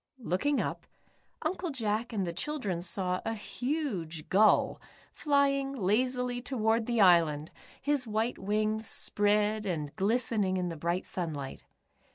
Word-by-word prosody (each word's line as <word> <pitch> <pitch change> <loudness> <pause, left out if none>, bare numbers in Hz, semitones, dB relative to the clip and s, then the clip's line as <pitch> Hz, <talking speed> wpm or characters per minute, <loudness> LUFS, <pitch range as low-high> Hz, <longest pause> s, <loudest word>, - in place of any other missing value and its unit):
" - - -56 0.2
Looking 285 +9 +2
up, - - -3 0.6
Uncle 350 +2 -2
Jack 230 -4 -1
and 200 -4 -1
the 170 - -3
children 205 - -2
saw 180 0 0
a 225 0 -2
huge 210 - -3
gull 210 +3 +4 0.3
flying 275 -2 +2
lazily 250 +3 0
toward 225 -3 0
the 235 -1 0
island, 165 -5 +4 0.3
his 285 -3 0
white 220 +3 -1
wings 215 +2 0
spread 210 +1 +2
and 150 -5 -3
glistening 210 -2 +1
in 180 -1 -1
the 165 - -5
bright 170 +4 -2
sunlight. 150 -7 -5
215 Hz, 135 wpm, -30 LUFS, 180-250 Hz, 0.6 s, gull